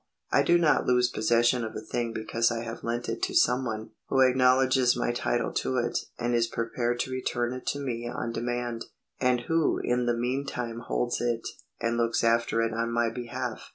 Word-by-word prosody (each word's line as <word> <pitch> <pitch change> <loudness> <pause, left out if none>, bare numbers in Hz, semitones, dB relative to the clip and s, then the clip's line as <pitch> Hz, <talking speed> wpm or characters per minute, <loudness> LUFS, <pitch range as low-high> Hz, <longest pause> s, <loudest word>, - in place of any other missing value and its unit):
I - - +5
do 175 - +4
not 165 -3 +3
lose 125 -1 +3
possession 120 +2 +2
of 110 0 -5
a - - -3
thing 115 +2 -3
because 115 +1 0
I 115 -1 -3
have 115 0 -7
lent 120 +1 -2
it 115 0 -3
to - - -1
some 125 +2 +3
one 110 -2 -4 0.2
who 135 - +2
acknowledges 130 0 +4
my 120 - 0
title 120 0 -1
to 130 - -1
it 120 -1 -1 0.2
and 120 0 -1
is 115 -1 +2
prepared 120 +1 -2
to 130 - -4
return 125 -1 -1
it 130 - -8
to 145 - -1
me 120 -4 -3
on 120 -1 -3
demand, 120 0 -3 0.3
and 125 -2 +2
who 165 +4 +1
in 125 0 0
the 120 -1 +1
meantime 125 -1 -2
holds 120 +1 -1
it 120 -1 -1 0.3
and 115 0 0
looks 115 0 +1
after 115 0 +2
it 115 -1 -1
on 115 +1 -1
my 115 -1 +1
behalf. 120 0 -5
120 Hz, 200 wpm, -28 LUFS, 115-125 Hz, 0.3 s, I